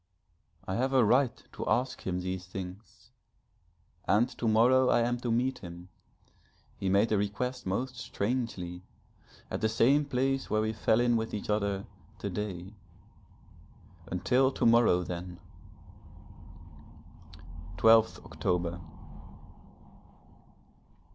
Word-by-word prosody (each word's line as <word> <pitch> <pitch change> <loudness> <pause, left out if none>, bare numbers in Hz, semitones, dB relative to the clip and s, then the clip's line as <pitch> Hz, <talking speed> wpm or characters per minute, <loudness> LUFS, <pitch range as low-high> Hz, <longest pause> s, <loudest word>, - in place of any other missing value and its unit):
I 95 - -2
have 130 +2 0
a 130 -4 +5
right 125 +3 +2
to - - -5
ask 130 -3 -1
him 90 -1 -1
these 95 0 -4
things. 95 +3 -9 1.0
And 105 +5 +4
to 120 - -1
morrow 125 +4 +4
I - - +4
am 120 +1 0
to 120 - -3
meet 125 +3 0
him, 85 0 -10 0.9
he 95 - -2
made 100 +4 +3
the 105 - +2
request 105 +4 -3
most 125 +7 -2
strangely 110 -6 -3 0.7
at - - -3
the 110 - +2
same 135 +7 +3
place 135 0 -1
where 110 - +1
we 110 0 -1
fell 110 +1 +2
in 120 -1 +3
with 110 -1 -3
each 105 0 -3
other 100 -2 -1 0.3
to 100 - -4
day 95 -1 -5 1.3
until 125 +9 +2
to - - -1
morrow 115 -6 +5
then! 90 0 -6 2.4
_12th 110 +4 +4
October. 90 -1 -2
110 Hz, 120 wpm, -30 LUFS, 95-125 Hz, 2.4 s, a